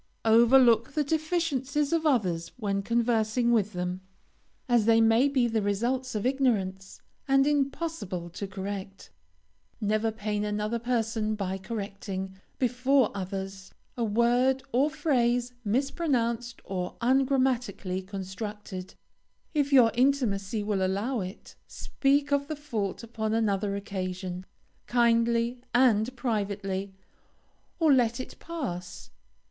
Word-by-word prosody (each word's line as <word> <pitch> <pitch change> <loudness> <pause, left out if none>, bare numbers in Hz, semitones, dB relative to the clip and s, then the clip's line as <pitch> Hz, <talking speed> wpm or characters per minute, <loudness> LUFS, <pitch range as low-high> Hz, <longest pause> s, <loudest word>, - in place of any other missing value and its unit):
Overlook 235 +1 +5
the 300 - +1
deficiencies 300 -2 0
of 325 -1 +2
others 180 - 0
when 200 -4 -1
conversing 235 +1 +1
with 215 -3 +2
them, 180 +1 -3 0.7
as 240 -4 +3
they 225 0 +5
may 225 +4 +5
be 260 -4 +2
the 225 -1 0
results 240 +5 -1
of 210 - -2
ignorance, 205 -8 -1 0.2
and 270 0 +4
impossible 275 - -1
to 200 +3 -5
correct. 195 0 -6 0.7
Never 215 +1 +1
pain 210 -1 -3
another 210 +2 -1
person 225 -2 -1
by 195 -2 -3
correcting, 195 -2 -5 0.2
before 255 0 +2
others, 195 0 -6 0.2
a 240 - -2
word 240 +4 +2
or 270 +5 +3
phrase 250 -5 +1
mispronounced 240 -1 -1
or 180 -2 -4
ungrammatically 250 -7 +1
constructed. 190 0 -7 0.6
If 290 -2 +1
your 245 -5 +6
intimacy 230 -6 +1
will 205 -2 0
allow 205 +7 -1
it, 185 +3 -8
speak 285 +1 0
of 280 0 +1
the 310 - -3
fault 230 -9 -4
upon 220 -1 -2
another 205 -2 0
occasion, 185 -2 -5 0.4
kindly 235 0 +2
and 245 -1 +3
privately, 200 -5 -2 0.8
or 320 -4 +4
let 240 -2 +2
it 255 - -8
pass. 180 - -6
230 Hz, 115 wpm, -28 LUFS, 200-260 Hz, 0.8 s, your